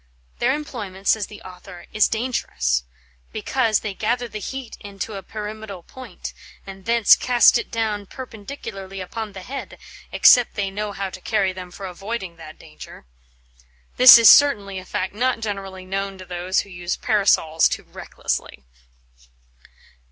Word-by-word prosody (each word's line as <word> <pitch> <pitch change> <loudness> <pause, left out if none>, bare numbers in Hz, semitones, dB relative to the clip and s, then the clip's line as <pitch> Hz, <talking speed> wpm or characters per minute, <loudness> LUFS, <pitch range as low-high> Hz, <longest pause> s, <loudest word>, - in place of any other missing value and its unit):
Their 255 +3 +2
employment, 210 -10 -7
says 220 -2 +2
the 210 - -13
author, 180 -1 -12
is 215 - +4
dangerous, 60 - -1 0.5
"because 215 - 0
they 210 -2 -4
gather 240 +4 -1
the 215 - -7
heate 265 +1 -6
into 200 +2 -7
a 195 - -6
pyramidall 210 -2 -8
point, 255 -8 -9 0.3
and 195 -1 -11
thence 230 -2 +6
cast 245 -1 +4
it - - -7
down 215 -3 -2
perpendicularly 205 -6 -8
upon 210 +3 -6
the 190 -1 -9
head, 270 +6 -7 0.3
except 245 -2 +5
they 195 -2 -2
know 210 +1 -4
how 195 -1 -4
to 185 - -10
carry 195 -3 0
them 185 -1 -8
for 195 +2 -9
auoyding 190 -1 -6
that 155 -1 -12
danger." 155 - -13 0.9
This 255 -1 +11
is 230 -1 +6
certainly 205 -10 +6
a 185 - -12
fact 190 -1 -3
not 250 +3 0
generally 195 -3 -6
known 195 +1 -4
to 185 - -11
those 180 +1 -1
who 200 - -14
use 175 0 -4
Parasols 195 -7 +2
too - - -4
recklessly. 65 - -5
200 Hz, 150 wpm, -22 LUFS, 185-225 Hz, 0.9 s, This